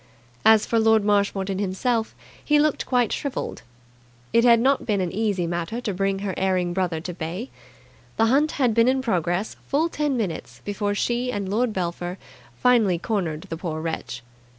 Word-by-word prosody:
As 220 -1 +6
for 230 - +1
Lord 220 -1 +4
Marshmoreton 200 -2 +1
himself, 220 +4 -1 0.3
he 300 - +3
looked 300 0 +1
quite 245 -4 +2
shrivelled. 280 -3 -4 0.7
It 230 0 +5
had 235 -1 +6
not 270 +3 +2
been 205 -3 0
an 180 -2 -1
easy 205 -4 0
matter 175 +6 -3
to 225 -5 -3
bring 195 +1 0
her 190 - -2
erring 185 -2 0
brother 180 -3 -1
to 180 +2 -5
bay. 175 +9 -5 0.7
The 225 - +4
hunt 280 +6 +3
had 250 -5 +2
been 230 +1 +4
in 260 0 +2
progress 180 -2 -1
full 310 +4 +1
ten 295 -4 -1
minutes 160 - -4
before 205 0 -1
she 240 +4 0
and 205 -4 -3
Lord 225 +5 +1
Belpher 175 -1 -3 0.4
finally 230 -8 +3
cornered 170 -5 -2
the 165 - -6
poor 160 -2 -4
wretch. 155 -6 -5
205 Hz, 175 wpm, -24 LUFS, 180-240 Hz, 0.7 s, As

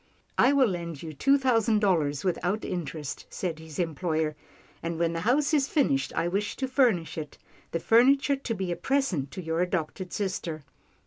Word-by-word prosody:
" - - -39
I 255 - +6
will 280 -2 +5
lend 170 -4 -5
you 160 -1 -6
two 275 - +4
thousand 230 -5 +2
dollars 160 -9 +1
without 185 +3 -1
interest," 160 -5 -5
said 170 -4 -4
his 160 -2 -10
employer, 160 -2 -1 0.2
" - - -29
and 165 0 -3
when 170 0 +1
the 165 - -2
house 275 - +2
is 285 -2 +3
finished, 140 - +1
I 170 - +1
wish 200 +4 -1
to 265 - -2
furnish 235 - +2
it 150 -2 -8 0.2
— - - -29
the 165 - -1
furniture 270 - +4
to 265 -4 -4
be 190 -2 -3
a - - 0
present 180 - 0
to 185 - -6
your 165 +1 -1
adopted 180 0 -2
sister." 180 -6 -3
180 Hz, 195 wpm, -27 LUFS, 160-245 Hz, 0.2 s, I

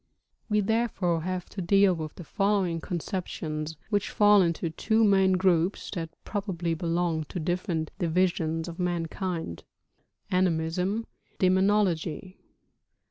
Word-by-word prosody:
We 210 0 +3
therefore 200 -6 0
have 180 +1 -3
to 195 - -6
deal 195 +2 +4
with 155 -3 -5
the 175 - -9
following 195 -3 0
conceptions, 160 -4 -4
which 205 -1 +1
fall 205 -1 +5
into 170 -1 0
two 220 +6 +1
main 195 -2 +4
groups, 180 0 +1
that 165 -4 -4
probably 185 -5 -2
belong 165 -1 -1
to 180 - -5
different 170 -1 -2
divisions 165 -2 0
of 170 0 -8
mankind: 170 - -3 0.3
( - - -39
Animism. 180 +5 0 0.2
( - - -38
Demonology. 185 -2 +1
180 Hz, 125 wpm, -27 LUFS, 165-195 Hz, 0.3 s, fall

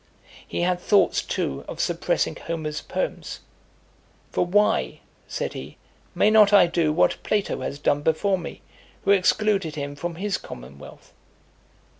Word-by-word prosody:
He - - -3
had 180 0 +1
thoughts 195 -1 +3
too 70 - -3
of - - -7
suppressing - - 0
Homer's 155 -2 -4
poems: - - -4 0.9
"For - - +1
why," 205 +4 +1 0.3
said - - -3
he, - - -8 0.4
"may 215 - +4
not 215 -2 +6
I 200 -3 +7
do 170 -2 +1
what 155 - +2
Plato 210 -2 -1
has 140 - -4
done 145 0 +1
before 180 +5 +1
me, 170 - -8 0.4
who 195 - +3
excluded 195 -3 +2
him 145 -1 -4
from 170 +3 -4
his 195 +2 -2
commonwealth?" 65 +3 -12
175 Hz, 140 wpm, -24 LUFS, 155-200 Hz, 0.9 s, I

